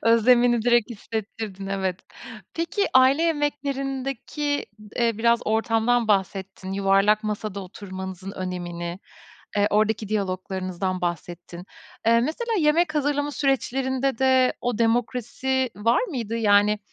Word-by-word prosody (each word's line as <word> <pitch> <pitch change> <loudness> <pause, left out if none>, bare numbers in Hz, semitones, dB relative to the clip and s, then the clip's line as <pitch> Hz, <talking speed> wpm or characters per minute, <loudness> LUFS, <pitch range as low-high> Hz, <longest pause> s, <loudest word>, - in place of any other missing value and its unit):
Özlemini 240 +1 +4
direkt 240 -1 +3
hissettirdin, 215 -3 -6
evet. 190 -2 -2 0.5
Peki 335 +5 0
aile 260 +4 +6
yemeklerindeki 285 -2 -2
d 210 -1 -14
eee, 230 -2 0
biraz 235 +1 +3
ortamdan 225 +1 +1
bahsettin, 190 -1 -1
yuvarlak 195 +2 +3
masada 210 -1 -3
oturmanızın 190 0 -7
önemini, 175 -2 -5 0.6
eee, 205 0 +3
oradaki 215 0 +1
diyaloglarınızdan 185 -2 -2
bahsettin. 175 +1 -5 0.4
Eee, 230 0 +5
mesela 330 - -2
yemek 310 0 +2
hazırlama 290 0 0
süreçlerinde 270 -2 0
de 260 -1 +4
o 245 -2 -2
demokrasi 245 +2 0
var 230 +3 +2
mıydı? 240 - -3
Yani, 210 -1 +4
225 Hz, 110 wpm, -24 LUFS, 195-265 Hz, 0.6 s, aile